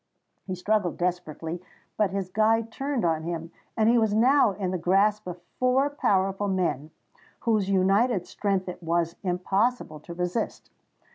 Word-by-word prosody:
He 185 - -3
struggled 185 -1 0
desperately: 175 -1 -3 0.3
but 210 -2 +2
his 190 -1 -4
guide 225 +2 +2
turned 270 -2 -2
on 160 -2 +1
him, 165 0 -5 0.3
and 220 -1 +3
he 235 +1 +5
was 220 -2 +1
now 250 +2 +5
in 190 -2 -3
the 185 - -2
grasp 200 +4 +2
of 180 0 -6 0.2
four 260 +3 +2
powerful 195 -6 +1
men, 175 -6 -1 0.5
whose 215 -4 +1
united 195 +2 +2
strength 195 -2 -1
it 180 0 -6
was 170 0 0
impossible 190 0 0
to 170 +3 -10
resist. 180 +5 -3
195 Hz, 150 wpm, -26 LUFS, 175-220 Hz, 0.5 s, he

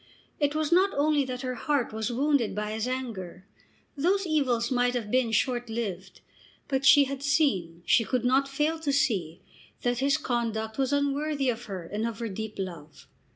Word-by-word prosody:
It 290 0 +1
was 310 0 0
not 375 +3 +5
only 295 0 +2
that 255 0 -5
her 255 -1 -2
heart 270 -2 -1
was 220 +2 -2
wounded 270 -3 +1
by 210 0 -2
his 220 +2 -2
anger. 210 -9 -5 0.5
Those 370 +7 +1
evils 255 -7 +1
might 245 0 +2
have 220 -4 -3
been 255 -3 +2
short 245 +1 0
lived. 195 -5 -5 0.5
But 270 -1 -1
she 285 - +8
had 275 0 -4
seen, 195 - +1
she 230 - +4
could 245 +1 -1
not 265 +2 +3
fail 300 +4 -1
to 300 -3 -1
see, 190 - 0 0.4
that 245 -1 0
his 280 +2 +2
conduct 230 -4 -2
was 265 0 +1
unworthy 285 0 0
of 240 0 -3
her 190 -4 -6
and 210 +6 -2
of 230 -2 -5
her 230 -1 -4
deep 215 +2 -5
love. 165 -6 -7
245 Hz, 185 wpm, -27 LUFS, 220-280 Hz, 0.5 s, she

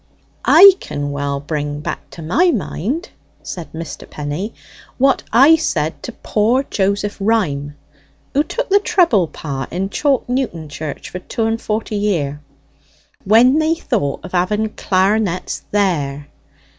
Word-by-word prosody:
"I 395 0 +10
can 145 0 -4
well 140 0 -2
bring 145 0 -3
back 150 - -6
to 165 - -10
my 330 - +3
mind," 250 - -2 0.3
said 175 -3 -7
Mr. 165 -1 -8
Penny, 150 +9 -4 0.5
"what 270 0 +3
I 275 +8 +7
said 160 - -2
to - - -6
poor 230 +4 +1
Joseph 205 -3 -1
Ryme 160 -10 0 0.6
(who 285 - +3
took - - -4
the 400 +1 +5
treble 345 - +3
part 140 -4 -6
in 190 +3 -3
Chalk 280 0 +1
Newton 245 - -2
Church 150 +1 -6
for 180 - -5
two 225 +4 -3
and 225 0 -1
forty 215 0 -2
year) 155 -9 -1 0.8
when 240 +8 +5
they 315 +1 +2
thought 140 - -2
of - - -8
having 210 +5 0
clar'nets 190 -2 0
there. 150 -9 0
200 Hz, 140 wpm, -18 LUFS, 150-245 Hz, 0.8 s, I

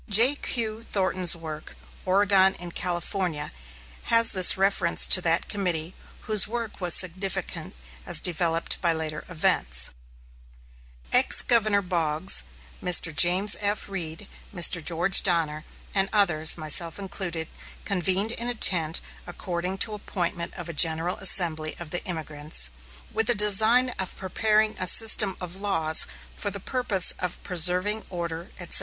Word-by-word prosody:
J.Q. 230 -1 +1
Thornton's 185 -5 0
work, 155 -2 -10 0.3
"Oregon 190 0 +2
and 175 -1 -9
California," 175 -3 -4 0.5
has 230 0 +4
this 185 -1 +4
reference 190 -3 +1
to 185 - +4
that 170 0 -1
committee, 180 -4 -3 0.3
whose 215 -3 +1
work 230 -2 -7
was 175 -2 +6
significant 185 - -2 0.3
as - - +2
developed 170 -1 -2
by 170 -2 0
later 155 -1 -6
events: 65 - -1 1.2
Ex - - +4
Governor 215 -4 +2
Boggs, 170 -1 -1 0.4
Mr. 170 -3 +3
James 185 +6 +5
F. 205 0 -3
Reed, 175 -1 -8 0.2
Mr. 175 -2 +2
George 175 +4 +1
Donner, 160 -4 -1 0.3
and 195 0 0
others, 175 -8 +2
myself 165 +1 -1
included, 175 -4 -5 0.4
convened 195 +2 -1
in 235 +1 -4
a 245 - -4
tent 165 -7 +2 0.3
according 175 +1 -6
to 215 +2 +1
appointment 175 -4 -5
of 175 -3 -8
a 170 - -7
general 165 +3 +2
assembly 165 -5 +4
of 170 -3 -10
the 175 - -3
emigrants, 155 - -6 0.4
with 225 - -1
the 240 - +3
design 220 +5 +4
of 190 -2 -3
preparing 215 +3 -1
a 185 - -2
system 210 -1 +5
of 180 0 -7
laws 165 -6 +4 0.3
for 205 - -5
the 200 - -8
purpose 210 -4 0
of 180 -1 -5
preserving 180 +4 +3
order, 170 -1 -7
etc. 175 - -1
180 Hz, 135 wpm, -24 LUFS, 165-200 Hz, 1.2 s, was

